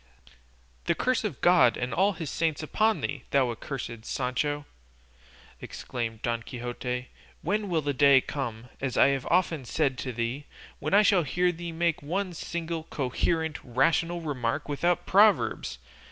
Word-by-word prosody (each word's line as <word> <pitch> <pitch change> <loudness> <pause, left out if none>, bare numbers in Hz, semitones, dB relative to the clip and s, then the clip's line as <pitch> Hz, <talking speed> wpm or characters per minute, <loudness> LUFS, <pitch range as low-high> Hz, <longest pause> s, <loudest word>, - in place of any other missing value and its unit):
"The - - +2
curse - - +1
of - - -4
God - - +5
and 125 +1 -3
all 200 +3 +3
his 160 -6 -5
saints 160 -2 -1
upon 215 +7 +1
thee, - - -4
thou 130 -3 +2
accursed 115 -2 -6
Sancho!" 145 +4 -2 1.0
exclaimed 115 -2 -5
Don 115 -1 -1
Quixote; 125 +1 -5 0.3
"when 205 +4 -1
will 165 -3 +1
the 145 0 0
day 140 0 +6
come 125 -4 -5
as 135 -2 -2
I - - +6
have 135 -2 -1
often 170 -5 +2
said 135 0 0
to 130 - -3
thee 120 +5 -3 0.3
when 155 +7 0
I 210 - +7
shall 195 -3 +4
hear 180 +5 +1
thee 170 0 -6
make 165 0 0
one 180 +5 -2
single 165 -1 -4
coherent, 160 +4 -1
rational 165 +7 +1
remark 145 -3 -2
without 175 +4 0
proverbs? 200 - +3
145 Hz, 155 wpm, -28 LUFS, 125-170 Hz, 1.0 s, I